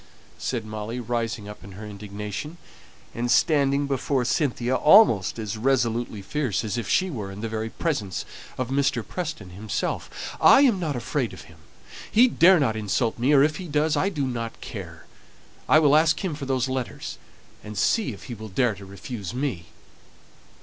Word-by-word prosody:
said 120 -4 -3
Molly, 110 +2 -5
rising 115 -3 -3
up 105 -2 -10
in 100 0 -11
her 105 +4 -9
indignation, 105 - -6 0.6
and 120 +1 -2
standing 140 0 +3
before 135 -1 0
Cynthia 125 -3 0
almost 150 - +5
as 110 -1 -4
resolutely 120 -4 0
fierce 125 -3 -1
as 105 -3 -2
if 120 - -3
she 185 -1 +2
were 105 -8 -5
in 100 +1 -8
the 115 - -2
very 110 0 -3
presence 110 - -2 0.3
of 130 -1 -2
Mr. 135 -4 0
Preston 155 - -5
himself. 100 +3 -4
"I - - +8
am 240 -9 +4
not 155 -5 -2
afraid 115 -5 -2
of - - -10
him. - - -17 0.5
He 240 +4 +6
dare 185 -6 +5
not 120 -7 +1
insult 110 +2 -1
me, 130 +5 +2
or 140 -2 +6
if 150 0 +1
he 185 - -7
does 150 +1 +1
I 195 - +1
don't 130 - -3
care. - - -8 0.6
I - - +7
will 150 -2 +5
ask 160 +5 +3
him 175 - -1
for 145 -2 -6
those 130 -1 0
letters, 130 -2 -4 0.4
and 105 -1 -8
see 220 - +2
if - - -10
he 125 - -7
will 110 -1 -8
dare 115 +4 +1
to 100 0 -11
refuse 100 0 -7
me." 125 - -3
120 Hz, 175 wpm, -25 LUFS, 105-150 Hz, 0.6 s, I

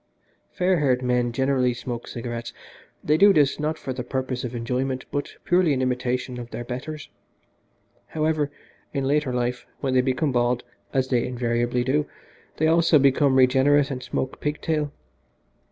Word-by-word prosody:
Fair 180 -1 +1
haired 130 -3 +2
men 125 -1 +1
generally 130 0 +1
smoke 120 -1 -6
cigarettes 120 0 -5 0.5
they 150 +1 +3
do 200 +4 +7
this, 150 -6 +3
not 155 +1 -1
for 130 - -5
the 125 -1 -4
purpose 130 0 -3
of 125 -1 -4
enjoyment, 130 +3 -2
but 145 - -3
purely 175 -3 +3
in 130 - -1
imitation 125 0 -1
of 120 -1 -7
their 120 - -5
betters. 135 +5 -6 1.0
However, 155 -2 0 0.5
in 135 - 0
later 145 -1 +1
life, 125 0 -2
when 135 -2 -1
they 130 - +5
become 130 +3 0
bald, 120 0 +1 0.3
as 130 -1 0
they 120 -2 +2
invariably 120 0 0
do, 145 +4 +1 0.5
they 155 - +1
also 165 0 +5
became 140 0 +4
regenerate 135 +2 +4
and 130 -1 -4
smoke 130 +1 -3
pig 150 +1 -2
tail. 150 -3 -1
130 Hz, 160 wpm, -24 LUFS, 125-145 Hz, 1.0 s, do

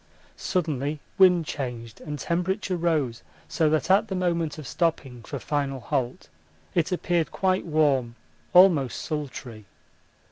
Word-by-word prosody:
Suddenly 150 -4 -1 0.2
wind 180 -3 +6
changed 120 -6 -6
and 150 -1 -5
temperature 185 +4 -1
rose 155 -9 0 0.3
so 160 -2 +1
that 155 +3 +1
at 200 +3 +4
the 190 - -3
moment 170 -4 -1
of 155 - -8
stopping 135 -6 -1
for - - -6
final 140 -2 -2
halt 130 -1 -3 0.5
it 170 +1 +1
appeared 175 -2 0
quite 185 -2 0
warm, 140 -7 +2 0.4
almost 175 -9 +5
sultry. 130 -7 -6
155 Hz, 130 wpm, -26 LUFS, 135-175 Hz, 0.5 s, wind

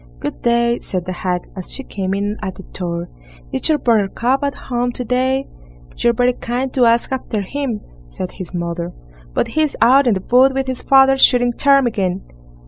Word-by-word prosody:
"Good - - -5
day!" 235 0 +2
said 180 -2 -3
the 185 - -4
hag, 180 0 -2
as 185 -2 -6
she 270 - -5
came 195 -5 -3
in 205 +1 -2
at 190 - -4
the 190 - -11
door; 170 -2 -5 0.5
"is - - +2
your 310 - +4
Buttercup 235 +3 +1
at 280 0 -1
home 245 -1 -2
to 250 - -3
day?" 260 +3 0 0.5
"You're 235 - +2
very 245 +2 +2
kind 250 +2 -3
to 250 -2 +3
ask 230 +2 +2
after 250 -5 -2
him", 240 +1 -3 0.3
said 180 - -5
his 185 -2 -8
mother; 170 0 -4 0.4
"but - - 0
he's 310 -2 0
out 265 +2 +5
in 225 - +3
the 190 - -4
wood 260 +2 +5
with 270 0 0
his 260 -1 -3
father, 270 0 +5
shooting 245 -2 +5
ptarmigan." 230 -10 +2
240 Hz, 190 wpm, -18 LUFS, 190-265 Hz, 0.5 s, out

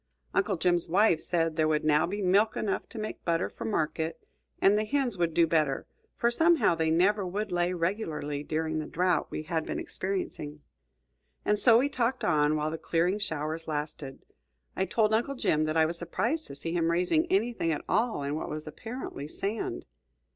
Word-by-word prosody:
Uncle 195 - +1
Jim's 175 0 +1
wife 180 -1 +4
said 165 -2 0
there 155 -1 +2
would 155 -1 +1
now 150 +1 +3
be 200 +3 -3
milk 200 +4 +3
enough 205 - -2
to - - -10
make 215 0 -5
butter 165 0 0
for - - -7
market; 160 -4 -1 0.4
and 195 +1 +5
the 215 - +2
hens 260 0 0
would 170 -2 0
do 165 +1 +4
better, 155 -4 +1 0.3
for 235 - +2
somehow 325 - +4
they 160 -1 0
never 195 +6 +3
would 200 +3 -3
lay 175 0 +1
regularly 165 -5 -2
during 155 +1 -2
the 155 - -4
drought 180 +1 +1
we - - -4
had 160 0 -1
been - - -4
experiencing. 165 -6 -3 0.8
And 210 0 +2
so 225 +2 +6
we 260 +4 +3
talked 255 -2 -1
on 150 -2 +3
while 155 0 -1
the 160 - -5
"clearing 175 +5 +1
showers" 160 -3 -3
lasted. 150 -3 -4 0.5
I 190 - 0
told 215 +3 +1
Uncle 240 +5 +1
Jim 155 - +1
that 155 +1 -1
I 160 - +5
was 170 +1 -3
surprised 235 - -1
to - - -9
see 165 +4 -1
him 165 -1 +1
raising 180 - +2
anything 240 - +1
at 150 - -3
all 225 -11 +1
in 140 +1 -2
what 155 - -3
was 155 0 -5
apparently 190 - -7
sand. 200 +7 -4
175 Hz, 190 wpm, -29 LUFS, 155-210 Hz, 0.8 s, so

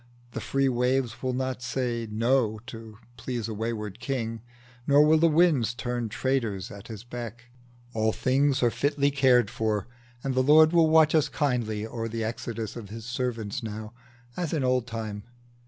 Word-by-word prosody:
The - - -5
free 135 0 +1
waves 125 -1 0
Will 130 -1 -1
not 130 -1 -2
say, 120 -3 -2
No, 115 0 +1
to 110 -2 -10 0.2
please 120 -4 -4
a 110 - -4
wayward 110 -2 -4
king, 115 -5 -3 0.5
Nor 145 +1 +6
will 155 +1 +5
the 165 - +5
winds 150 -8 +3
turn 120 -2 -3
traitors 115 -5 -1
at 100 -1 -10
his 110 -1 -8
beck: 120 0 -8 0.4
All 110 -1 +1
things 135 +3 +1
are 120 - +4
fitly 145 +1 +1
cared 125 -5 +4
for, 110 -4 -1 0.4
and 135 - -1
the 130 - +3
Lord 155 +4 +6
Will 165 -2 +5
watch 160 -1 +5
as 155 -2 +3
kindly 120 -7 -1
o'er 115 0 -4
the 115 0 -3
exodus 115 -1 -4
Of 120 -3 -7
us - - -14
his 115 -1 -8
servants 125 -1 -3
now, 110 0 -6 0.4
as 175 -3 -2
in 150 -4 0
old 125 -1 +1
time. 110 -3 -5
120 Hz, 175 wpm, -27 LUFS, 110-135 Hz, 0.5 s, Nor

